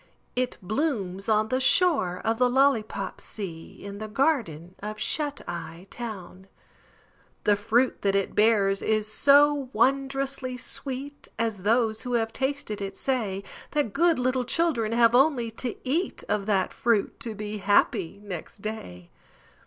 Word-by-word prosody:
It 250 0 -1
blooms 200 - -2
on 215 0 +2
the 255 - +1
shore 265 - +4
of 225 +1 0
the 250 0 +4
Lollypop 245 -7 +1
Sea 170 -6 -7
In 200 0 -7
the 215 - -5
garden 210 - 0
of 210 +1 -6
Shut 290 +6 -1
Eye 170 +1 -7
Town; 195 -5 -7 1.0
The 210 - +4
fruit 230 +5 +1
that 200 -1 +1
it 195 -1 0
bears 205 -3 +3
is 215 -1 +1
so 280 +4 +4
wondrously 270 +1 0
sweet 275 +2 -3
(As 225 -4 -1
those 220 +1 +2
who 250 -1 -4
have 225 -1 0
tasted 265 -6 -2
it 195 -1 -5
say) 215 -8 -1 0.3
That 290 -9 0
good 340 0 +3
little 255 0 +1
children 250 -5 +1
have 230 0 +4
only 250 -3 +3
to 245 -3 -3
eat 325 +8 -1
Of 205 -1 -1
that 195 -3 +1
fruit 230 -4 0
to 225 -2 -6
be 210 0 -5
happy 200 -2 +2
next 195 0 -8
day. 90 - -7
225 Hz, 145 wpm, -26 LUFS, 200-265 Hz, 1.0 s, shore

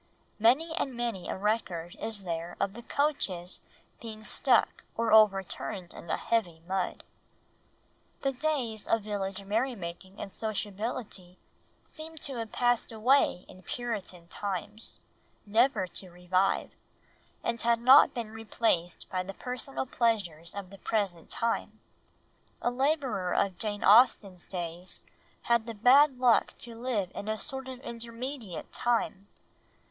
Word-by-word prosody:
Many 270 +10 +4
and 270 -5 -1
many 235 -6 -3
a - - -2
record 190 -5 -1
is 220 -3 0
there 170 -1 -4
of 195 - 0
the 235 - -8
coaches 220 - -1 0.4
being 220 -2 -8
stuck 245 +2 +2
or 230 -1 +2
overturned 195 -2 +3
in - - -10
the - - 0
heavy 185 -8 0
mud. 190 -1 -1 1.2
The 275 - +2
days 255 -6 -1
of 225 -2 +2
village 200 -2 -3
merry 230 +6 0
making 185 +1 -8
and 195 - -6
sociability 210 -3 -4 0.5
seemed 315 0 -9
to 275 -4 -3
have 225 -2 -4
passed 245 -1 +1
away 225 -3 +3
in 185 - -14
Puritan 195 -6 -5
times 205 +3 -5 0.4
never 220 -1 +3
to 185 +1 -7
revive, 180 +2 +1 0.7
and 235 0 -1
had 235 0 +3
not 260 +4 +8
been 230 -3 -4
replaced 220 -6 0
by 185 -1 0
the 195 +1 -7
personal 255 +2 -3
pleasures 195 -10 0
of 195 -2 -6
the 195 - -12
present 195 -7 -1
time. 230 0 -1 0.8
A 240 - 0
labourer 260 - 0
of 190 -3 +1
Jane 205 -2 -3
Austen's 200 -4 +5
days 175 0 -3 0.4
had 235 -1 +2
the 230 - -5
bad 260 +5 +6
luck 245 -2 +4
to 235 - -7
live 225 -6 -2
in 205 - -6
a 220 0 0
sort 265 +1 -4
of 260 -1 -7
intermediate 235 - -6
time. 225 -5 0
220 Hz, 135 wpm, -30 LUFS, 190-240 Hz, 1.2 s, not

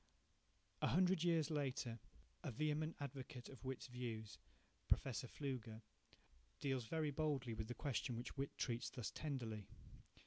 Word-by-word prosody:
A - - +5
hundred 180 -1 +5
years 165 -3 +4
later, 130 -5 0 0.4
a - - 0
vehement 155 +5 +1
advocate 135 -2 -5
of 135 - -9
Whytt's 130 -1 -2
views, 115 -4 -3 0.5
Professor 125 -1 +3
Pflüger, 120 -5 -3 0.8
deals 135 -4 +1
very 155 0 +2
boldly 140 -5 +1
with 110 0 -2
the 120 - -3
question 130 -4 0
which 120 - -3
Whytt 135 0 -2
treats 120 -2 +1
thus 120 -8 -3
tenderly. 115 -9 -2
130 Hz, 135 wpm, -44 LUFS, 120-150 Hz, 0.8 s, A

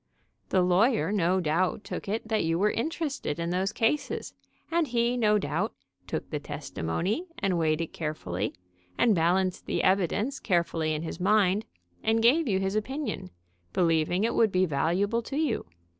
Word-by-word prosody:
"The 185 -1 +3
lawyer 185 - +3
no 190 -2 +2
doubt 175 +4 0
took - - -6
it 220 +2 -2
that 220 -1 +1
you 165 0 +1
were 210 +3 +3
interested 300 - -2
in 170 0 -2
those 190 +2 0
cases, 230 +8 -1 0.4
and 335 -2 +2
he 235 0 +1
no 210 -3 +3
doubt 205 - -2 0.3
took - - -4
the - - -1
testimony 185 - -3
and 195 -3 0
weighed 155 0 +1
it 165 - -5
carefully, 150 - -3 0.4
and 230 - +4
balanced 180 +2 +1
the - - 0
evidence 200 - +1
carefully 165 -4 0
in 155 - -4
his 165 - -5
mind, 200 +1 +3 0.4
and 225 0 +2
gave 285 +6 +4
you 195 -4 +2
his 195 +1 -1
opin 265 +7 -2
ion, - - -4 0.4
believing 170 +2 +2
it 230 - +1
would 220 -3 +3
be 185 0 +3
valuable 185 +9 +1
to 275 +4 -5
you. 300 - 0
195 Hz, 170 wpm, -28 LUFS, 170-225 Hz, 0.4 s, and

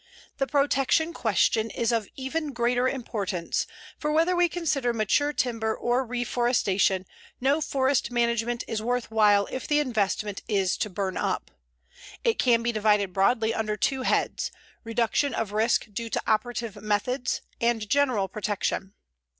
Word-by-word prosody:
The 270 - 0
protection 285 +3 +2
question 220 - +1
is 235 +1 -1
of 225 -3 0
even 285 +2 -3
greater 245 +1 +1
importance, 205 -9 -2 0.3
for 300 - -1
whether 330 +4 +3
we 350 0 +3
consider 290 -8 0
mature 230 +7 +1
timber 225 -5 -1
or 245 +2 0
reforestation, 240 -6 +1 0.3
no 280 +5 +2
forest 275 -1 +1
management 235 0 0
is 220 -2 -2
worth 245 0 -2
while 205 -2 +4
if 260 - -4
the 295 0 +3
investment 210 -6 -1
is 195 -4 +1
to 210 - -1
burn 190 0 -3
up. - - -2 0.7
It 465 -2 +1
can 235 -2 +3
be 235 - +1
divided 210 -3 +2
broadly 220 +4 +2
under 215 -2 -2
two 270 +3 0
heads, - - 0 0.3
reduction 230 +5 0
of 220 -3 -2
risk 220 +2 +2
due 230 +2 -4
to - - -2
operative 220 0 -1
methods 215 +5 -1 0.2
and 235 -2 +1
general 255 -6 +2
protection. 200 -1 -3
235 Hz, 145 wpm, -26 LUFS, 215-265 Hz, 0.7 s, while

